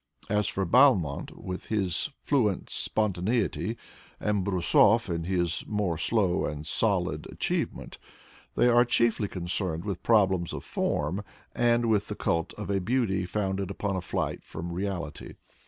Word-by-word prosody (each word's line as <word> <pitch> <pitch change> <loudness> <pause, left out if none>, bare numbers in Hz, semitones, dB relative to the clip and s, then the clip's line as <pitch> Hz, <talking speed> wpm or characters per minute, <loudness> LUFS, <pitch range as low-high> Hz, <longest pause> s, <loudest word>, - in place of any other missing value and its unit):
As 105 0 +2
for 95 - -1
Balmont, 95 - +4
with 90 0 -6
his 100 - -1
fluent 110 -10 +1
spontaneity, 105 +1 -1 0.4
and 105 -2 0
Brusov, 100 +3 +3
in 85 -1 -2
his 85 -3 0
more 105 -5 0
slow 95 +1 +1
and 75 0 -4
solid 90 -3 0
achievement, - - -3 0.6
they - - +4
are 120 0 +6
chiefly 115 -3 +2
concerned 90 -1 -3
with 100 -4 -3
problems 95 -6 +3
of - - -5
form 100 +3 -1 0.3
and 120 0 +2
with 105 -2 +2
the - - -4
cult 85 -1 -1
of 105 -1 -5
a 95 -1 +1
beauty 100 -4 0
founded 95 -1 -2
upon 100 0 -2
a 95 - -2
flight - - -3
from 85 +2 -6
reality. 90 -4 -4
95 Hz, 140 wpm, -28 LUFS, 90-110 Hz, 0.6 s, are